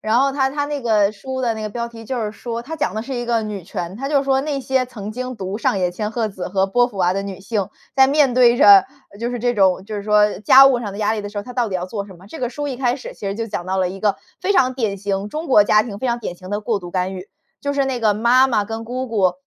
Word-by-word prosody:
然 220 Hz, +3 st, +2 dB
后 275 Hz, 0 st, +3 dB
它 270 Hz, -1 st, +1 dB
它 290 Hz, +1 st, -2 dB
那 290 Hz, -1 st, -3 dB
个 215 Hz, -4 st, +2 dB
书 260 Hz, +5 st, -6 dB
的 235 Hz, -2 st, +1 dB
那 220 Hz, -, -6 dB
个 215 Hz, -, -3 dB
标 235 Hz, +2 st, -4 dB
题 230 Hz, -1 st, -11 dB
就 250 Hz, +2 st, -3 dB
是 210 Hz, -, -3 dB
说 235 Hz, +1 st, -6 dB
它 320 Hz, +6 st, -6 dB
讲 300 Hz, -, -1 dB
的 220 Hz, -, -2 dB
是 270 Hz, -, -7 dB
一 240 Hz, 0 st, -3 dB
个 230 Hz, -1 st, +1 dB
女 205 Hz, -5 st, -6 dB
权。 180 Hz, 0 st, -5 dB
它 270 Hz, +3 st, -4 dB
就 285 Hz, -2 st, +2 dB
说 270 Hz, -1 st, +2 dB
那 285 Hz, -2 st, -2 dB
些 260 Hz, 0 st, 0 dB
曾 210 Hz, -4 st, -7 dB
经 255 Hz, +3 st, -5 dB
读 195 Hz, 0 st, -5 dB
上 205 Hz, -, +1 dB
野 180 Hz, -1 st, +1 dB
千 210 Hz, +4 st, -3 dB
鹤 225 Hz, -2 st, -1 dB
子 190 Hz, -2 st, -6 dB
和 190 Hz, 0 st, +1 dB
波 245 Hz, +4 st, +3 dB
伏 220 Hz, -6 st, -12 dB
娃 180 Hz, -1 st, +2 dB
的 195 Hz, -, -1 dB
女 195 Hz, -1 st, -7 dB
性， 200 Hz, -1 st, -2 dB, 0.3 s
在 265 Hz, 0 st, +7 dB
面 280 Hz, -2 st, +3 dB
对 245 Hz, -1 st, +5 dB
着， 200 Hz, -4 st, +8 dB, 0.3 s
就 235 Hz, +1 st, -2 dB
是 245 Hz, -2 st, -4 dB
这 245 Hz, 0 st, +1 dB
种 190 Hz, -3 st, +2 dB
就 215 Hz, 0 st, -6 dB
是 200 Hz, -, -5 dB
说 210 Hz, -1 st, +3 dB
家 260 Hz, +7 st, +8 dB
务 265 Hz, -3 st, +5 dB
上 210 Hz, -4 st, -5 dB
的 200 Hz, -, -8 dB
压 215 Hz, 0 st, +1 dB
力 215 Hz, -, -3 dB
的 205 Hz, -, -5 dB
时 205 Hz, -, -12 dB
候， -, -, -3 dB
她 250 Hz, +4 st, -9 dB
到 240 Hz, -3 st, 0 dB
底 190 Hz, -, -5 dB
要 180 Hz, 0 st, -2 dB
做 200 Hz, 0 st, -5 dB
什 190 Hz, -, -12 dB
么？ 185 Hz, +3 st, -16 dB
这 320 Hz, -, -9 dB
个 245 Hz, -, -1 dB
书 290 Hz, +3 st, -4 dB
一 260 Hz, -, -4 dB
开 245 Hz, -1 st, +1 dB
始， 265 Hz, -, -8 dB
其 205 Hz, -, -7 dB
实 195 Hz, -, -2 dB
就 230 Hz, +1 st, -4 dB
讲 175 Hz, -3 st, -4 dB
到 190 Hz, +1 st, -1 dB
了 185 Hz, -1 st, +1 dB
一 190 Hz, +2 st, -7 dB
个 205 Hz, 0 st, +1 dB, 0.3 s
非 400 Hz, -, +1 dB
常 260 Hz, -8 st, +3 dB
典 220 Hz, -6 st, -1 dB
型， 200 Hz, 0 st, -3 dB
中 310 Hz, +8 st, -5 dB
国 210 Hz, -6 st, +6 dB
家 210 Hz, +1 st, +4 dB
庭 210 Hz, -3 st, -7 dB
非 260 Hz, -, -2 dB
常 235 Hz, 0 st, -1 dB
典 175 Hz, -, -5 dB
型 185 Hz, +1 st, -11 dB
的 205 Hz, 0 st, -1 dB
过 215 Hz, 0 st, -1 dB
度 175 Hz, -2 st, -10 dB
干 185 Hz, 0 st, -1 dB
预。 185 Hz, +2 st, -8 dB, 0.3 s
就 285 Hz, -, -2 dB
是 280 Hz, -1 st, +1 dB
那 265 Hz, -2 st, -2 dB
个 215 Hz, -3 st, +2 dB
妈 245 Hz, +4 st, +4 dB
妈 215 Hz, -5 st, +1 dB
跟 225 Hz, +2 st, -6 dB
姑 255 Hz, +2 st, -4 dB
姑 195 Hz, -5 st, +2 dB
220 Hz, 340 characters per minute, -20 LUFS, 200-255 Hz, 0.3 s, 着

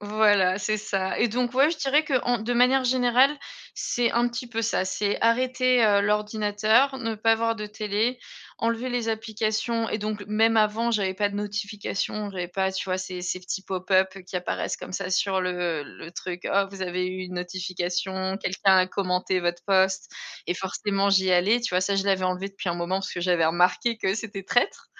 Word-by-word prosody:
Voilà 205 Hz, -3 st, +3 dB
c'est 215 Hz, +2 st, 0 dB
ça 195 Hz, -3 st, -2 dB
et 235 Hz, -, +4 dB
donc 245 Hz, +2 st, -1 dB
ouais, 275 Hz, +4 st, +5 dB
je 335 Hz, -, -5 dB
dirais 290 Hz, +2 st, +2 dB
qu'en 245 Hz, -4 st, +1 dB
de 220 Hz, +3 st, -2 dB
manière 255 Hz, +2 st, +4 dB
générale 255 Hz, +3 st, +3 dB, 0.4 s
c'est 240 Hz, -1 st, 0 dB
un 240 Hz, +1 st, +2 dB
petit 240 Hz, +1 st, -6 dB
peu 230 Hz, -1 st, -3 dB
ça. 215 Hz, -4 st, 0 dB
C'est 200 Hz, +2 st, -1 dB
arrêter, 255 Hz, +1 st, +3 dB
heu, 205 Hz, -1 st, +4 dB
l'ordinateur, 210 Hz, +5 st, +2 dB
ne 225 Hz, -2 st, -3 dB
pas 225 Hz, +2 st, +3 dB
avoir 230 Hz, 0 st, 0 dB
de 210 Hz, -, -5 dB
télé, 215 Hz, +3 st, -1 dB, 0.4 s
enlever 230 Hz, +2 st, -1 dB
les 240 Hz, -2 st, -1 dB
applications 220 Hz, +1 st, -1 dB
et 215 Hz, -, -2 dB
donc 210 Hz, -1 st, -4 dB
même 225 Hz, +1 st, +3 dB
avant 220 Hz, +2 st, +2 dB
j'avais 195 Hz, -3 st, 0 dB
pas 205 Hz, +2 st, +1 dB
de 200 Hz, -, -9 dB
notifications, 205 Hz, 0 st, -3 dB
j'avais 180 Hz, -2 st, -4 dB
pas 190 Hz, +2 st, -1 dB
tu 190 Hz, -, -3 dB
vois 185 Hz, -1 st, -1 dB
ces 185 Hz, -1 st, -6 dB
ces 180 Hz, +1 st, -3 dB
petits 190 Hz, +1 st, -5 dB
pop-up 190 Hz, 0 st, +1 dB
qui 185 Hz, -, -5 dB
apparaissent 180 Hz, -, -3 dB
comme -, -, -9 dB
ça 190 Hz, -1 st, -3 dB
sur 190 Hz, 0 st, +1 dB
le 180 Hz, -4 st, -2 dB
le 165 Hz, -, -11 dB
truc: 180 Hz, -1 st, -6 dB
«Oh 200 Hz, 0 st, +3 dB
vous 195 Hz, -, -10 dB
avez 180 Hz, 0 st, -2 dB
eu 185 Hz, 0 st, -5 dB
une 180 Hz, 0 st, -8 dB
notification, 185 Hz, +1 st, -3 dB
quelqu'un 190 Hz, 0 st, +2 dB
a 185 Hz, -, +4 dB
commenté 185 Hz, -1 st, -1 dB
votre 175 Hz, 0 st, -2 dB
post» 190 Hz, -1 st, +2 dB, 0.3 s
et 175 Hz, -, 0 dB
forcément 195 Hz, +1 st, -1 dB
j'y 190 Hz, -1 st, +3 dB
allais, 195 Hz, +7 st, +4 dB
tu 235 Hz, -, -2 dB
vois? 180 Hz, -, +3 dB
Ça 195 Hz, +2 st, 0 dB
je 195 Hz, -, +1 dB
l'avais 190 Hz, -2 st, +1 dB
enlevé 185 Hz, +2 st, -1 dB
depuis 195 Hz, -1 st, -6 dB
un 170 Hz, -, 0 dB
moment 175 Hz, +2 st, -2 dB
parce 195 Hz, -, -5 dB
que 175 Hz, -, -4 dB
j'avais 175 Hz, -2 st, +2 dB
remarqué 200 Hz, -, +2 dB
que 190 Hz, -, 0 dB
c'était 205 Hz, -3 st, -6 dB
traître 245 Hz, -, 0 dB
200 Hz, 200 wpm, -25 LUFS, 185-225 Hz, 0.4 s, ouais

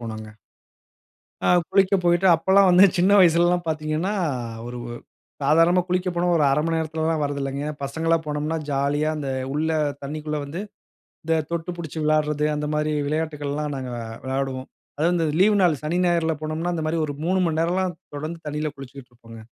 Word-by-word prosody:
போனோங்க. 110 Hz, -2 st, -7 dB, 1.2 s
ஆ -, -, +3 dB, 0.2 s
குளிக்க 195 Hz, 0 st, +3 dB
போயிட்டு 175 Hz, +2 st, +3 dB
அப்பலாம் 190 Hz, +3 st, +4 dB
வந்து 180 Hz, +2 st, +7 dB
சின்ன 185 Hz, +3 st, +3 dB
வயசுலலாம் 175 Hz, 0 st, +4 dB
பாத்தீங்கன்னா, 155 Hz, +5 st, -1 dB, 0.5 s
ஒரு 120 Hz, 0 st, -6 dB, 0.6 s
சாதாரணமா 165 Hz, +5 st, +4 dB
குளிக்க 180 Hz, +1 st, 0 dB
போனா 175 Hz, +1 st, 0 dB
ஒரு 155 Hz, -, +3 dB
1/2 145 Hz, +3 st, +2 dB
மணி 165 Hz, 0 st, 0 dB
நேரத்துலலாம் 160 Hz, 0 st, -1 dB
வரதில்லைங்க. 140 Hz, -1 st, -2 dB, 0.2 s
பசங்களலா 165 Hz, +4 st, 0 dB
போனோம்னா, 150 Hz, +2 st, -2 dB
ஜாலியா 145 Hz, +3 st, 0 dB
அந்த 145 Hz, -3 st, -4 dB, 0.2 s
உள்ள 155 Hz, +2 st, 0 dB, 0.3 s
தண்ணிக்குள்ள 150 Hz, +1 st, -4 dB
வந்து, 155 Hz, +7 st, -6 dB, 0.6 s
இந்த 160 Hz, 0 st, +1 dB
தொட்டு 170 Hz, +1 st, -3 dB
புடிச்சு 160 Hz, -1 st, -6 dB
விளாடுறது, 150 Hz, -1 st, +1 dB
அந்த 150 Hz, 0 st, -3 dB
மாரி 150 Hz, 0 st, 0 dB, 0.2 s
விளையாட்டுக்கள்லாம் 150 Hz, -1 st, -2 dB
நாங்க 130 Hz, -1 st, -5 dB, 0.3 s
விளையாடுவோம். 130 Hz, 0 st, -3 dB, 0.3 s
அதுவும் 170 Hz, +3 st, +2 dB
இந்த 165 Hz, -2 st, +1 dB
லீவ் 205 Hz, 0 st, +5 dB
நாள் 160 Hz, -6 st, +2 dB
சனி, 165 Hz, +4 st, -1 dB
ஞாயிறுல 165 Hz, -2 st, +1 dB
போனோம்னா, 160 Hz, +3 st, -2 dB
அந்த 160 Hz, -2 st, -3 dB
மாரி 165 Hz, +1 st, 0 dB
ஒரு 145 Hz, -, -4 dB
3 185 Hz, +1 st, +2 dB
மணி 160 Hz, 0 st, 0 dB
நேரம்லாம் 180 Hz, +2 st, 0 dB, 0.2 s
தொடர்ந்து 155 Hz, +3 st, -5 dB
தண்ணியில 150 Hz, +1 st, -2 dB
குளிச்சிக்ட்டு 135 Hz, -1 st, -11 dB
இருப்போங்க. 115 Hz, -2 st, -13 dB
155 Hz, 155 wpm, -23 LUFS, 145-170 Hz, 1.2 s, வந்து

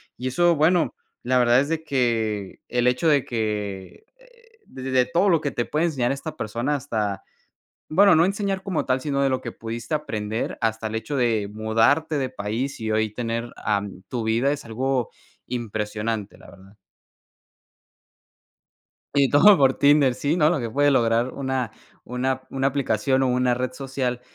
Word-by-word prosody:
Y 125 Hz, -, -5 dB
eso, 170 Hz, +6 st, +3 dB
bueno, 165 Hz, +3 st, +2 dB, 0.3 s
la 125 Hz, +1 st, +2 dB
verdad 120 Hz, +1 st, +5 dB
es 140 Hz, +3 st, -1 dB
de 160 Hz, -1 st, -2 dB
que, 115 Hz, -8 st, -1 dB
el 120 Hz, 0 st, 0 dB
hecho 125 Hz, +6 st, +1 dB
de 145 Hz, -4 st, +3 dB
que, 105 Hz, -, -4 dB
eh, 475 Hz, -2 st, -24 dB
de 130 Hz, -, -10 dB
de 130 Hz, -1 st, +4 dB
todo 180 Hz, +4 st, +2 dB
lo 165 Hz, -3 st, +3 dB
que 145 Hz, -, -1 dB
te 120 Hz, -, -2 dB
puede 155 Hz, +3 st, 0 dB
enseñar 135 Hz, -6 st, 0 dB
esta 155 Hz, +3 st, -5 dB
persona 120 Hz, +7 st, -2 dB
hasta 105 Hz, -7 st, -3 dB, 0.7 s
bueno, 195 Hz, +4 st, +6 dB
no 165 Hz, +2 st, +5 dB
enseñar 195 Hz, 0 st, -2 dB
como 190 Hz, -5 st, -2 dB
tal, 130 Hz, 0 st, +1 dB
sino 140 Hz, 0 st, -1 dB
de 135 Hz, -, +3 dB
lo 130 Hz, -, -1 dB
que 120 Hz, -, -6 dB
pudiste 115 Hz, +4 st, -6 dB
aprender, 110 Hz, -7 st, -3 dB
hasta 110 Hz, -1 st, -1 dB
el 110 Hz, -, -5 dB
hecho 140 Hz, +6 st, -3 dB
de 115 Hz, -5 st, +1 dB
mudarte 115 Hz, +9 st, +2 dB
de 130 Hz, -2 st, -1 dB
país 120 Hz, +4 st, -4 dB
y 110 Hz, -, -3 dB
hoy 110 Hz, -1 st, +1 dB
tener 115 Hz, 0 st, -3 dB
ah, 100 Hz, -1 st, 0 dB, 0.2 s
tu 120 Hz, -3 st, -3 dB
vida, 115 Hz, +5 st, +1 dB
es 145 Hz, 0 st, -4 dB
algo 125 Hz, +2 st, -1 dB, 0.4 s
impresionante, 110 Hz, -2 st, -4 dB
la -, -, -15 dB
verdad. 95 Hz, +1 st, -17 dB, 2.4 s
Y 140 Hz, -2 st, +4 dB
todo 195 Hz, +8 st, +7 dB
por 135 Hz, -1 st, +4 dB
Tinder. 140 Hz, -3 st, +4 dB
Sí, 145 Hz, +6 st, -1 dB
no, 150 Hz, -3 st, +4 dB
lo 165 Hz, -6 st, 0 dB
que 115 Hz, -2 st, -4 dB
puede 145 Hz, +4 st, +3 dB
lograr 120 Hz, -1 st, +2 dB
una 130 Hz, -4 st, -2 dB, 0.3 s
una 130 Hz, +2 st, -2 dB
una 135 Hz, 0 st, 0 dB
aplicación 130 Hz, -1 st, 0 dB
o 130 Hz, -, +2 dB
una 125 Hz, 0 st, +2 dB
red 130 Hz, 0 st, -3 dB
social, 130 Hz, -2 st, -3 dB
130 Hz, 175 wpm, -23 LUFS, 115-145 Hz, 2.4 s, todo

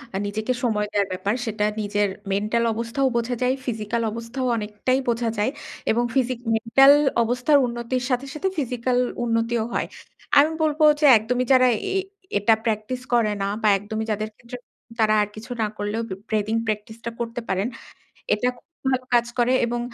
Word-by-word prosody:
আ -, -, +1 dB
নিজেকে 215 Hz, +4 st, -2 dB
সময় 210 Hz, -4 st, +1 dB
দেওয়ার 200 Hz, -1 st, +1 dB
ব্যাপার 195 Hz, +3 st, -1 dB
সেটা 215 Hz, -1 st, -1 dB, 0.2 s
নিজের 205 Hz, 0 st, +1 dB, 0.2 s
মেন্টাল 215 Hz, +4 st, +1 dB
অবস্থাও 230 Hz, +4 st, -1 dB
বোঝা 235 Hz, +1 st, -1 dB
যায়, 250 Hz, +1 st, +2 dB
ফিজিক্যাল 230 Hz, -1 st, -2 dB
অবস্থাও 230 Hz, +3 st, -4 dB
অনেকটাই 215 Hz, +5 st, -1 dB
বোঝা 235 Hz, 0 st, 0 dB
যায়, 210 Hz, +5 st, +1 dB, 0.4 s
এবং 235 Hz, +2 st, +2 dB
ফিজিক 255 Hz, -2 st, +1 dB, 0.2 s
মেন্টাল 270 Hz, +5 st, +6 dB, 0.3 s
অবস্থার 250 Hz, +5 st, +3 dB
উন্নতির 240 Hz, +1 st, -3 dB
সাথে, 250 Hz, +1 st, 0 dB
সাথে 345 Hz, +5 st, -2 dB
ফিজিক্যাল 250 Hz, -2 st, -1 dB, 0.3 s
উন্নতিও 230 Hz, 0 st, 0 dB
হয়। -, -, -1 dB, 0.5 s
আমি 300 Hz, +3 st, +4 dB
বলব 305 Hz, 0 st, 0 dB, 0.2 s
যে 305 Hz, -, +3 dB
একদমই 245 Hz, +4 st, -1 dB
যারা 255 Hz, -1 st, +6 dB, 0.3 s
এ -, -, +3 dB, 0.4 s
এটা 205 Hz, +3 st, +4 dB
প্র্যাকটিস 225 Hz, +3 st, -2 dB
করে 230 Hz, -3 st, +3 dB
না, 195 Hz, -, 0 dB
বা 215 Hz, -, +2 dB
একদমই 215 Hz, +2 st, -4 dB
যাদের 215 Hz, +1 st, -2 dB
ক্ষেত্রে 245 Hz, +1 st, -9 dB, 0.4 s
তারা 215 Hz, -1 st, +4 dB
আর 210 Hz, -, 0 dB
কিছু 215 Hz, +3 st, -10 dB
না 215 Hz, -, +2 dB
করলেও 205 Hz, +2 st, -2 dB
b -, -, -11 dB, 0.2 s
breathing 220 Hz, +1 st, 0 dB
প্র্যাকটিস 215 Hz, +1 st, -3 dB
টা 235 Hz, -, -1 dB
করতে 235 Hz, +1 st, -3 dB
পারেন। 190 Hz, +3 st, 0 dB, 0.7 s
এটা 245 Hz, +4 st, 0 dB
খুব -, -, -25 dB, 0.2 s
ভালো 255 Hz, -1 st, 0 dB
কাজ 240 Hz, 0 st, +4 dB
করে, 240 Hz, +1 st, +3 dB
এবং 240 Hz, 0 st, -2 dB
230 Hz, 170 wpm, -23 LUFS, 215-250 Hz, 0.7 s, মেন্টাল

